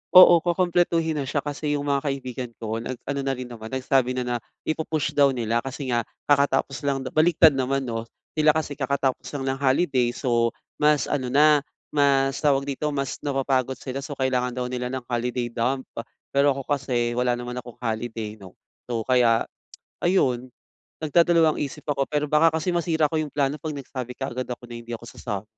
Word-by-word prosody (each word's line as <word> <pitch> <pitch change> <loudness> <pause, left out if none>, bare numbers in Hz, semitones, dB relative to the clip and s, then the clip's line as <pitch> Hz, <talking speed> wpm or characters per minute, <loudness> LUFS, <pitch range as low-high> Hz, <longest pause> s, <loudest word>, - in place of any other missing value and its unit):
Oo, 175 -2 +10
kukumpletuhin 170 -2 +1
na 135 - -3
siya 140 +1 -1
kasi 145 0 -2
yung 145 - -2
mga 140 - +2
kaibigan 130 -3 -4
ko 110 0 -4
nag-ano 130 +4 -4
na 135 0 0
rin 130 - -5
naman 115 -3 -9
nagsabi 130 0 +1
na 125 - -1
na 120 0 -1 0.3
i-pu-push 155 -1 -1
daw 140 -2 +4
nila 115 -1 0
kasi 135 +1 -5
nga 120 -1 0 0.2
kakatapos 140 -2 +2
lang 135 -1 0
daw 130 - -5
baligtad 160 +1 +5
naman, 135 0 0
'no? 115 -2 -4 0.2
Sila 155 -1 +3
kasi 155 -2 -1
kakatapos 140 -2 -1
lang 135 - -3
ng 135 - -4
holiday 130 -3 +2
so 120 -3 +1 0.2
mas 150 -1 +3
ano 130 -3 -1
na 150 +3 +5 0.3
mas 135 -2 +2
tawag 140 -2 +2
dito 140 +2 -3
mas 140 -2 -2
napapagod 135 -2 0
sila 135 +1 -5
so 145 +1 -6
kailangan 125 -2 0
daw 125 - -2
nila 125 0 -2
ng 130 -1 -4
holiday 120 0 -1
dump 130 +3 -1 0.5
pero 140 0 +3
ako 135 - -5
kasi 125 -4 0
wala 125 0 +1
naman 120 0 -5
akong 120 -1 -11
holiday, 110 -2 -4
'no? 95 -2 -13 0.3
So, 115 -2 -2
kaya 120 -2 +3 0.6
ayun, 130 -9 +2 0.6
nagdadalawang-isip 160 -2 +2
ako 140 -2 -1
pero 150 0 0
baka 160 +1 +5
kasi 170 +3 -1
masira 160 -3 +1
ko 160 - +1
yung 155 - -3
plano 145 +1 0
'pag 155 -3 -4
nagsabi 125 -2 -6
kaagad 130 -2 -4
ako 125 0 -6
na 120 - -6
hindi 120 0 -9
ako 120 - -15
sasam. 105 -3 -5
135 Hz, 185 wpm, -24 LUFS, 125-150 Hz, 0.6 s, Oo